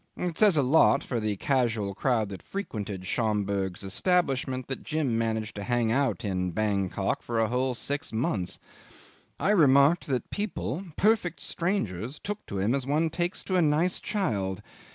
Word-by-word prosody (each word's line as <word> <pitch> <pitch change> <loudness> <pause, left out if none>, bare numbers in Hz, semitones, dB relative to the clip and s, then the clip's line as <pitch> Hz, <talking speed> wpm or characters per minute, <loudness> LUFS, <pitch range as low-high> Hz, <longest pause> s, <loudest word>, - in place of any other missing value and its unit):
It 175 -2 -2
says 205 -5 +5
a 145 - +4
lot 140 +1 +4
for 120 - -2
the 105 -1 -1
casual 115 -4 0
crowd 110 -1 0
that 95 - -7
frequented 105 - -5
Schomberg's 100 -3 -1
establishment 135 - 0
that 135 - -4
Jim 155 -7 -1
managed 110 -1 -1
to 100 - -4
hang 120 -1 +1
out 125 -3 0
in 90 -3 -1
Bankok 100 -2 0
for 115 -1 -2
a 110 - +3
whole 125 +2 0
six 145 +4 -3
months. 105 -5 -1 0.8
I 200 - +2
remarked 150 -2 +5
that 130 -3 -2
people, 195 -4 -3
perfect 205 -5 +2
strangers, 135 - -2
took 205 +1 -5
to 100 - -4
him 100 +5 +1
as 135 -1 -1
one 155 +3 +1
takes 175 +2 -2
to 185 - 0
a - - +4
nice 160 +4 +2
child. 100 - -2
125 Hz, 165 wpm, -28 LUFS, 105-160 Hz, 0.8 s, says